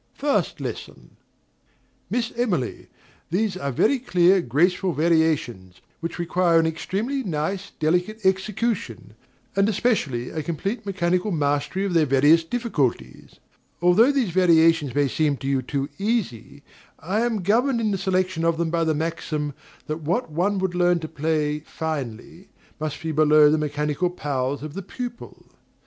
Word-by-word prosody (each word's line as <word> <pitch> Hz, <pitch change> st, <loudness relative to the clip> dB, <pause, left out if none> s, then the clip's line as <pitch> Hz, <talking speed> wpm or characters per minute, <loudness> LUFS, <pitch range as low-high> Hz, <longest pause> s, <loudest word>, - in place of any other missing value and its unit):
First 285 Hz, 0 st, 0 dB
Lesson. -, -, -7 dB, 0.9 s
Miss 235 Hz, -1 st, -1 dB
Emily, 190 Hz, -, -2 dB, 0.4 s
these 195 Hz, +3 st, 0 dB
are 140 Hz, -7 st, -3 dB
very 255 Hz, -, +2 dB
clear, 185 Hz, -5 st, +3 dB
graceful 175 Hz, +7 st, +1 dB
variations, 150 Hz, -, 0 dB, 0.2 s
which 165 Hz, 0 st, -5 dB
require 175 Hz, -1 st, +2 dB
an 165 Hz, -, +2 dB
extremely 200 Hz, -, -2 dB
nice, 190 Hz, -, -3 dB
delicate 180 Hz, +7 st, 0 dB
execution; 190 Hz, -, -1 dB, 0.4 s
and, 195 Hz, +2 st, +3 dB
especially, 160 Hz, -, 0 dB
a 155 Hz, -, -3 dB
complete 195 Hz, -, -4 dB
mechanical 185 Hz, 0 st, 0 dB
mastery 145 Hz, +3 st, 0 dB
of 195 Hz, -, -2 dB
their 160 Hz, -3 st, +3 dB
various 145 Hz, +5 st, +5 dB
difficulties. 150 Hz, -, -2 dB, 0.4 s
Although 180 Hz, +10 st, +5 dB
these 260 Hz, -9 st, 0 dB
variations 165 Hz, -6 st, +4 dB
may 145 Hz, -1 st, +3 dB
seem 145 Hz, +1 st, 0 dB
to 135 Hz, -, -6 dB
you 135 Hz, -1 st, +1 dB
too 135 Hz, +2 st, -3 dB
easy, 180 Hz, -, -2 dB, 0.3 s
I 190 Hz, +7 st, -2 dB
am 230 Hz, -5 st, -1 dB
governed 235 Hz, +6 st, +2 dB
in 220 Hz, -2 st, 0 dB
the 195 Hz, -, 0 dB
selection 185 Hz, -2 st, 0 dB
of 165 Hz, -1 st, +2 dB
them 165 Hz, -1 st, -1 dB
by 165 Hz, -1 st, +1 dB
the 160 Hz, -1 st, +1 dB
maxim 155 Hz, -2 st, -3 dB, 0.3 s
that 155 Hz, +2 st, -4 dB
"what 170 Hz, +5 st, -1 dB
one 190 Hz, +6 st, 0 dB
would 190 Hz, -1 st, -1 dB
learn 175 Hz, -1 st, +2 dB
to 160 Hz, -, -4 dB
play 155 Hz, -1 st, -1 dB
finely 155 Hz, -, -6 dB, 0.3 s
must 150 Hz, -1 st, -4 dB
be 160 Hz, -, -2 dB
below 150 Hz, -1 st, +5 dB
the 155 Hz, -, +2 dB
mechanical 150 Hz, +3 st, -1 dB
powers 140 Hz, -4 st, -3 dB
of 155 Hz, -1 st, -6 dB
the 195 Hz, -, -5 dB
pupil." 240 Hz, +4 st, -8 dB
165 Hz, 150 wpm, -23 LUFS, 150-195 Hz, 0.9 s, various